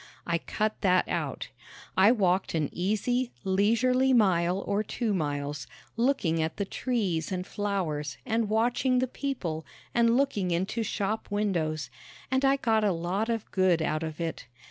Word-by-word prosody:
I 170 -1 0
cut 215 +5 -2
that 185 -1 +3
out. - - -3 0.5
I 195 +4 +6
walked 190 -6 +1
an 155 -3 0
easy, 225 +7 0
leisurely 230 +7 +3
mile 185 -4 +3
or 200 +1 +1
two 220 0 -2
miles, 145 -4 -2 0.3
looking 230 -10 +1
at 160 0 -2
the 200 - -1
trees 195 -9 -1
and 185 -1 -2
flowers 185 -8 -2
and 225 -3 0
watching 240 +4 +2
the 255 - +3
people 220 - -3 0.3
and 235 0 +4
looking 240 -10 +1
into 190 +7 -1
shop 215 0 -2
windows, 170 - -1 0.4
and 260 +1 +2
I 270 0 +5
got 225 -5 +1
a 205 - +3
lot 180 +6 -1
of 225 -2 -2
good 185 -3 +3
out 155 -1 -1
of 160 -1 -5
it. 165 -7 -4
200 Hz, 155 wpm, -28 LUFS, 170-230 Hz, 0.5 s, I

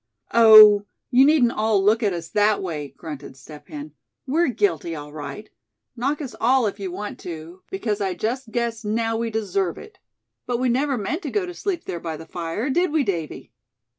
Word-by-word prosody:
"Oh! 215 -3 +8 0.2
you 260 +2 +6
needn't 280 -6 +4
all 215 -3 +1
look 215 +4 +3
at 210 -3 +1
us 170 -2 -5
that 210 0 +2
way," 155 -6 -4
grunted 145 -4 -9
Step 150 +2 -13
Hen. 150 0 -8 0.3
"We're 325 +6 +1
guilty, 175 - 0
all 145 -1 -9
right. 155 +8 -7 0.5
Knock 275 +5 -1
us 270 -4 -6
all 250 0 +3
you 195 -2 -6
want 205 +3 -6
to, 170 +2 -9
because 220 - -2
I 190 -2 -1
just 235 +6 -3
guess 235 -1 -2
now 225 +2 -1
we 230 +1 -1
deserve 195 -5 -1
it. 430 -3 -13 0.5
But 245 -1 0
we 255 +1 0
never 270 +2 +1
meant 240 - -3
to - - -4
go 415 -3 -1
to 355 - -7
sleep 355 -2 -3
there 170 - -5
by 165 -2 -5
the 160 - -10
fire, 175 - -3
did 350 +4 +1
we, 310 -2 +2
Davy?" 170 - -4
215 Hz, 195 wpm, -23 LUFS, 175-250 Hz, 0.5 s, Oh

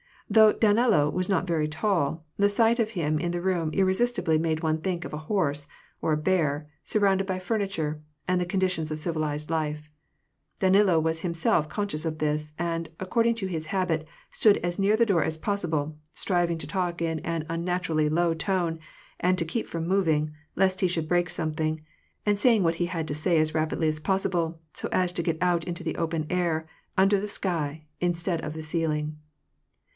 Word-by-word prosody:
Though 215 0 +6
Danilo 215 -8 +3
was 185 +3 -1
not 190 -2 +2
very 160 -4 0
tall, 160 -1 0
the 200 0 +4
sight 225 +3 +3
of 220 -1 +1
him 155 -6 0
in 170 +2 -1
the 175 0 -2
room 175 -3 0
irresistibly 190 -1 +2
made 160 0 -1
one 160 0 +1
think 175 0 -2
of - - -7
a - - -2
horse, 145 -8 0 0.3
or 160 - +1
a - - +2
bear, 150 -3 +1 0.2
surrounded 195 -2 +2
by 185 -1 -1
furniture 185 -7 -2 0.3
and 185 0 +2
the - - 0
conditions 180 -3 0
of 155 0 -3
civilized 155 -2 -2
life: 150 -1 -2 0.7
Danilo 190 -2 +4
was 160 0 0
himself 165 -2 +1
conscious 200 -7 -3
of 160 -1 -2
this, 150 0 -1
and, 165 -1 -2
according 230 +5 +2
to 220 -4 -3
his 160 -4 -4
habit, 170 -5 -1 0.2
stood 210 -2 +4
as 175 +2 -3
near 200 +2 +4
the 235 +1 +4
door 195 -7 +3
as 160 0 -1
possible, 160 -6 -1 0.2
striving 175 -3 0
to - - -5
talk 175 -3 -2
in 160 -1 0
an 165 -1 -3
unnaturally 165 -2 0
low 170 +2 +2
tone, 170 -1 -1 0.4
and 185 +1 +2
to 165 - +1
keep 220 +8 -3
from 165 -1 -3
moving, 160 -5 +2 0.2
lest 190 0 +2
he 185 - +3
should 165 -3 -2
break 175 0 +2
something, 155 0 -1 0.5
and 205 -1 +2
saying 225 -3 +4
what 165 -1 +2
he 175 - 0
had 165 -3 -3
to - - -1
say 165 +3 +1
as 155 0 +2
rapidly 160 0 0
as 155 0 -2
possible, 170 -2 0
so - - -4
as 180 -1 +2
to 175 - -1
get 165 -1 -1
out 175 -2 +2
into 175 -1 -5
the - - -3
open 165 -1 -1
air, 170 -3 0 0.3
under 195 +1 +4
the 205 - -3
sl^, 160 -7 -2 0.2
instead 175 -1 0
of 150 - -5
the 160 0 -6
ceiling. 155 -1 -1
170 Hz, 190 wpm, -27 LUFS, 155-190 Hz, 0.7 s, Though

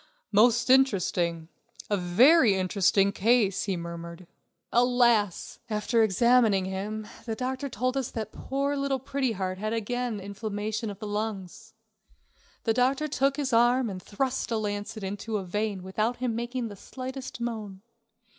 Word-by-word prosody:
"Most 240 +3 +4
interesting; 180 -10 +2 0.4
a 205 - +1
very 215 - +5
interesting 195 +1 +2
case," 210 -1 +2
he 195 -3 -1
murmured. 170 +1 -7 0.5
Alas! 240 -5 +2
after 215 +2 +1
examining 220 -1 +4
him, 205 +3 -4 0.2
the 225 - -2
doctor 260 +3 -3
told 255 +3 -1
us 265 -3 -1
that 220 -2 -5
poor 280 +1 -2
little 275 -1 0
Pretty 265 -1 -2
Heart 185 -1 -3
again 230 +2 -2
had 195 - -8
inflammation 215 +2 -4
of 200 - -7
the 215 - -7
lungs. 205 -3 -5 0.9
The 225 - +2
doctor 265 +5 +1
took 275 -1 +1
his 270 -4 -2
arm 240 0 +3
and 185 -1 -7
thrust 250 +7 -2
a 230 - 0
lancet 210 +1 -4
into 205 +3 -3
a 195 - -5
vein 205 0 -2
without 215 +6 -1
him 245 -2 -2
making 240 0 -3
the 205 - -9
slightest 260 +5 -7
moan. 215 -5 -5
220 Hz, 145 wpm, -27 LUFS, 200-250 Hz, 0.9 s, very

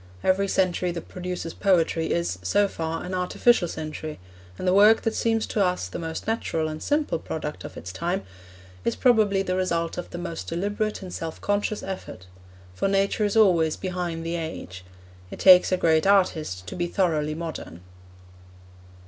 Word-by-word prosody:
Every 195 +1 +2
century 185 -2 +1
that 170 - -7
produces 180 -2 -5
poetry 170 -4 +1
is, 85 +2 -1
so 200 - +2
far, 165 -3 -4
an 180 - -5
artificial 185 +2 +2
century, 155 -1 -6 0.4
and - - -4
the 180 - +4
work 210 +3 +6
that 225 - 0
seems 225 -1 +1
to 205 - 0
us 180 - 0
the - - -6
most 160 -1 -5
natural 190 -8 -1
and 155 0 -6
simple 295 - 0
product 150 -2 -5
of - - -9
its 90 - -7
time 175 - -2 0.6
is 115 - 0
probably 215 -6 +3
the 185 -1 -1
result 170 -2 -1
of 175 - -6
the - - -7
most 175 -2 -5
deliberate 205 +4 -2
and 185 - -8
self 165 -1 -5
conscious 205 +1 -1
effort. 185 - -7 0.5
For 90 - -1
Nature 195 +2 +1
is 205 +2 0
always 170 -7 +4
behind 175 -3 -3
the 170 +1 -2
age. 95 - -6 0.5
It - - -8
takes 185 -1 +7
a 185 - +3
great 160 0 +3
artist 160 - +2
to - - -7
be 175 -1 -1
thoroughly 155 -5 0
modern. 160 - -6
180 Hz, 175 wpm, -25 LUFS, 160-195 Hz, 0.6 s, takes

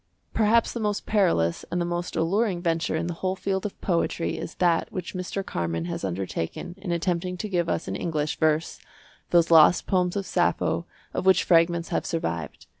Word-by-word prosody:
Perhaps 225 +1 +3
the 235 - -4
most 210 -2 -1
perilous 170 - +2
and 175 - -1
the 175 - 0
most 175 +1 -3
alluring 180 +4 +1
venture 165 -2 0
in 160 +1 -1
the 175 - -2
whole 185 0 0
field 190 +1 -2
of 200 - -13
poetry 170 -2 0
is - - -6
that 175 -2 +1
which 180 -3 -5
Mr. 185 +1 -4
Carman 85 -1 -2
has 85 - -4
undertaken 95 - -4
in 190 -2 -4
attempting 180 +1 -1
to 215 - -4
give 175 -4 0
us 85 - -1
in 95 - -3
English 155 +3 -2
verse 155 0 +1 0.5
those 170 -1 +4
lost 165 +2 +7
poems 180 -2 +1
of 200 -1 -2
Sappho 175 -1 0 0.3
of 190 - -2
which 190 - +5
fragments 170 0 +3
have - - -1
survived. 85 - -3
175 Hz, 190 wpm, -26 LUFS, 160-185 Hz, 0.5 s, lost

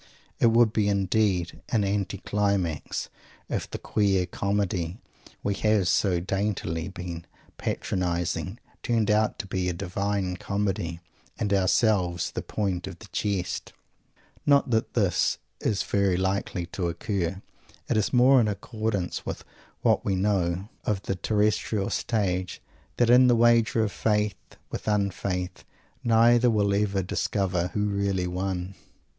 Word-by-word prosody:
It - - +5
would 115 -1 +4
be 105 -2 +2
indeed 100 -3 +1
an 110 -4 +2
anti 100 -1 -1
climax 100 -6 -1 0.4
if - - -2
the - - -4
queer 100 -3 +1
Comedy 95 -2 -1 0.5
we 100 - +1
have 105 -2 +2
so 90 -1 +2
daintily 95 -3 -2
been 90 -3 -7 0.3
patronizing 90 +2 -2 0.2
turned 115 -3 +1
out 105 0 +2
to - - -5
be 95 -1 -1
a - - -1
Divine 100 +1 -2
Comedy 95 -4 -2 0.4
and 100 -1 0
ourselves 95 -2 +2
the - - -3
point 95 -4 -2
of 95 -2 -8
the 110 0 -14
jest! 100 -2 -2 0.7
Not 140 -2 +4
that 110 -1 0
this - - +2 0.2
is 105 -3 0
very 100 -3 +1
likely 95 -1 -1
to 90 -3 -1
occur. 90 +1 -2 0.5
It - - 0
is 110 -1 +1
more 130 +1 +6
in 110 - +2
accordance 105 -2 -2
with - - -5 0.4
what - - +3
we 95 - 0
know 95 -1 0 0.2
of 100 -2 -1
the - - -1
terrestrial 105 0 0
stage 95 -6 -1 0.4
that 120 -1 +4
in 125 +1 +7
this 120 - +5
wager 115 -1 +4
of 105 - -1
faith 105 -4 -1 0.2
with - - -6
un 100 -2 +2
faith 90 0 -4 0.4
neither 120 +1 +5
will 105 -3 +2
ever 100 -1 +1
discover 90 -1 0
who 105 0 +1
really 100 -2 0
won! 90 +1 -3
100 Hz, 140 wpm, -26 LUFS, 90-105 Hz, 0.7 s, in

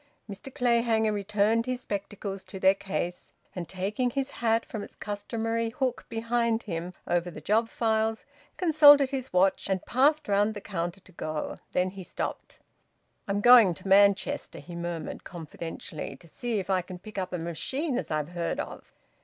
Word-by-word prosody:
Mr 205 +6 -8
Clayhanger 235 -3 +2
returned 210 +3 +1
his 255 0 -2
spectacles 200 -2 -5
to 190 - -9
their 190 0 +6
case, 185 -2 -4 0.2
and 175 -3 -5
taking 205 +7 -1
his 275 +2 -2
hat 230 -1 +1
from 215 - -6
its - - -10
customary 225 +2 -2
hook 250 +1 -2
behind 230 0 0
him, 175 -2 -5
over 175 0 0
the 170 - -9
job 225 +2 +1
files, 220 -1 0 0.3
consulted 290 -5 +7
his 265 -2 -4
watch 190 +2 +2
and 190 -1 -1
passed 295 +5 +3
round 205 +2 +2
the - - -4
counter 185 -2 -4
to 185 - -18
go. 155 -3 -4 0.2
Then 180 +1 +1
he 195 -1 -8
stopped. - - -5 0.7
"I'm 200 0 0
going 235 -6 +8
to 175 - -10
Manchester," 200 0 +3
he 175 - -9
murmured 170 -1 -5
confidentially. 165 0 -7
"To 170 - -17
see 235 +6 -3
if 190 - -3
I 185 -1 +3
can 180 0 -9
pick 200 +2 -7
up 185 - -3
a 180 - -2
machine 255 - -2
as 255 - -2
I've 155 0 -1
heard 175 -1 -2
of." - - -7
205 Hz, 170 wpm, -28 LUFS, 185-230 Hz, 0.7 s, going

